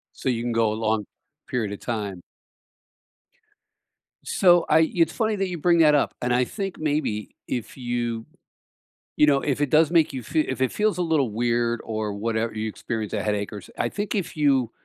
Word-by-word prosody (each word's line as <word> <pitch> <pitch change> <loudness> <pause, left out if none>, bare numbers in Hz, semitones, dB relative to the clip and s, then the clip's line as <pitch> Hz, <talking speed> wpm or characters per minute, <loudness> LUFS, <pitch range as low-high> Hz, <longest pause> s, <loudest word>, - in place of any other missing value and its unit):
So - - -3
you 120 -2 0
can 120 0 -2
go 115 -2 +2
a - - -2
long 110 -1 0 0.4
period 110 -5 -1
of 100 - -7
time. 105 -6 -4 2.0
So 175 -2 +4
I 160 +1 +4
it's 165 -2 +3
funny 220 -2 0
that 195 -1 -1
you 175 -1 -4
bring 170 +2 +3
that 155 -2 +6
up, 145 - +2
and 125 0 0
I 125 +1 +3
think 195 - -5
maybe 145 -9 -2
if 120 - -4
you 120 -3 -3 0.9
you 150 - +5
know, 140 -2 +4
if 145 -1 -1
it 145 - +2
does 155 0 +5
make 165 -3 +3
you 130 -2 -5
fe 155 +7 0
if 130 -3 -2
it 130 - +1
feels 210 -2 +1
a - - +1
little 155 -7 +1
weird 120 +1 0
or 110 -2 -3
whatever 110 +2 -2
you 110 0 -2
experience 110 0 -4
a 105 - -1
headache 105 -1 -2
or 105 - -5
s 95 - -13
I - - +1
think 205 0 -3
if 195 -6 -2
you 135 -6 +2
125 Hz, 200 wpm, -24 LUFS, 110-160 Hz, 2.0 s, that